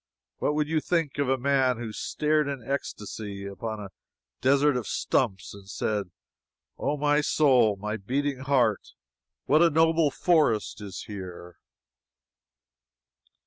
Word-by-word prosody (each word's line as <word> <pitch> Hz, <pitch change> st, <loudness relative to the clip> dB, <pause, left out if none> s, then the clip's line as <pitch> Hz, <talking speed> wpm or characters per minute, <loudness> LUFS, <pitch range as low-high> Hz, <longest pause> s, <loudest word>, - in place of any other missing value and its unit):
What 150 Hz, -, 0 dB
would 150 Hz, -1 st, +1 dB
you 160 Hz, 0 st, +1 dB
think 160 Hz, -4 st, -1 dB
of 140 Hz, -2 st, +1 dB
a 135 Hz, -, +2 dB
man 130 Hz, -1 st, +2 dB
who 115 Hz, -2 st, -6 dB
stared 150 Hz, +3 st, 0 dB
in 135 Hz, -5 st, -5 dB
ecstasy 105 Hz, -6 st, -5 dB
upon 110 Hz, +2 st, -5 dB
a 100 Hz, -2 st, -8 dB, 0.5 s
desert 140 Hz, +2 st, +4 dB
of 125 Hz, -3 st, -3 dB
stumps 95 Hz, -8 st, -1 dB
and 100 Hz, -1 st, -13 dB
said: 105 Hz, -2 st, -2 dB, 0.7 s
"Oh, 145 Hz, +2 st, -1 dB
my 145 Hz, +1 st, +2 dB
soul, 130 Hz, -8 st, +4 dB
my 105 Hz, +2 st, -4 dB
beating 135 Hz, +6 st, -2 dB
heart, 130 Hz, -6 st, +1 dB, 0.5 s
what 155 Hz, +3 st, +4 dB
a 170 Hz, -, +6 dB
noble 160 Hz, 0 st, +3 dB
forest 140 Hz, -, +1 dB
is 100 Hz, -3 st, -7 dB
here!" 90 Hz, -4 st, -9 dB
130 Hz, 135 wpm, -27 LUFS, 105-145 Hz, 0.7 s, a